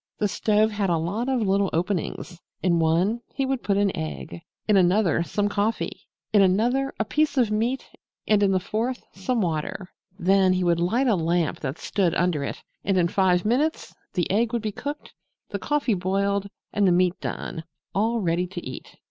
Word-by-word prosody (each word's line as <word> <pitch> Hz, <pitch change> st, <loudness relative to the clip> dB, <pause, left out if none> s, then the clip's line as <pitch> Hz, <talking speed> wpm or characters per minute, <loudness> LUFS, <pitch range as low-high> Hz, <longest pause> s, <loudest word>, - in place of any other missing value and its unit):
The 210 Hz, -, +1 dB
stove 215 Hz, +2 st, +2 dB
had 205 Hz, -2 st, -1 dB
a 170 Hz, -, +2 dB
lot 200 Hz, +10 st, -2 dB
of 260 Hz, -3 st, +1 dB
little 195 Hz, -1 st, +2 dB
openings. 175 Hz, 0 st, -2 dB, 0.2 s
In 170 Hz, -2 st, +3 dB
one 175 Hz, +8 st, +2 dB
he 270 Hz, -, 0 dB
would 265 Hz, -1 st, -1 dB
put 200 Hz, -1 st, +1 dB
an 200 Hz, -1 st, +2 dB
egg, 75 Hz, +2 st, -5 dB, 0.3 s
in 210 Hz, -, +4 dB
another 185 Hz, -1 st, +3 dB
some 205 Hz, +4 st, 0 dB
coffee, 205 Hz, +2 st, -2 dB, 0.3 s
in 205 Hz, -, +6 dB
another 240 Hz, +9 st, +2 dB
a 220 Hz, -, +1 dB
piece 300 Hz, +4 st, +1 dB
of 235 Hz, -4 st, +3 dB
meat 235 Hz, +5 st, 0 dB, 0.4 s
and 210 Hz, -1 st, +4 dB
in 200 Hz, -1 st, +4 dB
the 190 Hz, -, +2 dB
fourth 225 Hz, +7 st, -2 dB
some 225 Hz, +5 st, -1 dB
water. 175 Hz, +2 st, -3 dB, 0.3 s
Then 190 Hz, 0 st, +4 dB
he 185 Hz, 0 st, 0 dB
would 170 Hz, -1 st, +2 dB
light 220 Hz, +10 st, +1 dB
a 240 Hz, -, +4 dB
lamp 170 Hz, -1 st, 0 dB
that 135 Hz, +1 st, -4 dB
stood 185 Hz, -5 st, 0 dB
under 170 Hz, -5 st, +1 dB
it, -, -, -5 dB, 0.2 s
and 195 Hz, -2 st, +1 dB
in 170 Hz, -1 st, +3 dB
five 180 Hz, -1 st, +2 dB
minutes 280 Hz, +9 st, 0 dB, 0.2 s
the 175 Hz, -, +1 dB
egg 225 Hz, +4 st, +1 dB
would 235 Hz, -2 st, -1 dB
be 215 Hz, -, -1 dB
cooked, 290 Hz, +8 st, -6 dB, 0.4 s
the -, -, -4 dB
coffee 295 Hz, -6 st, 0 dB
boiled 200 Hz, +2 st, 0 dB, 0.2 s
and 205 Hz, -2 st, +3 dB
the -, -, +5 dB
meat 180 Hz, 0 st, +2 dB
done 160 Hz, -, -4 dB, 0.3 s
all 225 Hz, +3 st, +1 dB
ready 175 Hz, 0 st, 0 dB
to 175 Hz, -4 st, -7 dB
eat. 130 Hz, -, -9 dB
195 Hz, 190 wpm, -25 LUFS, 175-220 Hz, 0.4 s, in